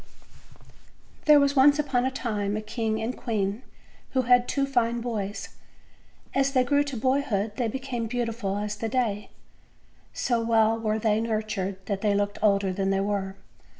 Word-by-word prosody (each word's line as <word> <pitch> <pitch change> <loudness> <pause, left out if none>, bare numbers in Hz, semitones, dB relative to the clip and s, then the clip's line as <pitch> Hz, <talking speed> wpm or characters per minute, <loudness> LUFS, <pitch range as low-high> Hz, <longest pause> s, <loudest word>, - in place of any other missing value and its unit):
THEKE 300 -1 +8
was 280 0 +2
once 285 +2 +6
upon 270 -4 0
a - - +2
time 210 -6 -2
a - - -3
king 220 0 -2
and 230 +3 -3
queen 210 -1 -2 0.5
who 260 -1 +2
had 245 0 +4
two 275 -1 0
fine 240 -3 0
boys. 215 -4 -4 0.8
As 275 0 +1
they 255 -2 +4
grew 285 +3 +2
to 275 -3 -5
boyhood 245 -4 0
they 245 -3 0
be 225 - -3
came 250 -4 -4
beautiful 230 -4 -2
as 210 0 -3
the 225 +1 -3
day; 220 -4 -1 0.8
so 240 -2 0
well 225 0 +3
were 215 -1 0
they 220 0 +1
nurtured 215 -4 -3
that 195 -1 -3
they 210 -2 +2
looked 205 0 -1
older 200 -2 +2
than 195 +1 -1
they 195 0 +1
were. 195 -1 -2
225 Hz, 170 wpm, -26 LUFS, 205-255 Hz, 0.8 s, THEKE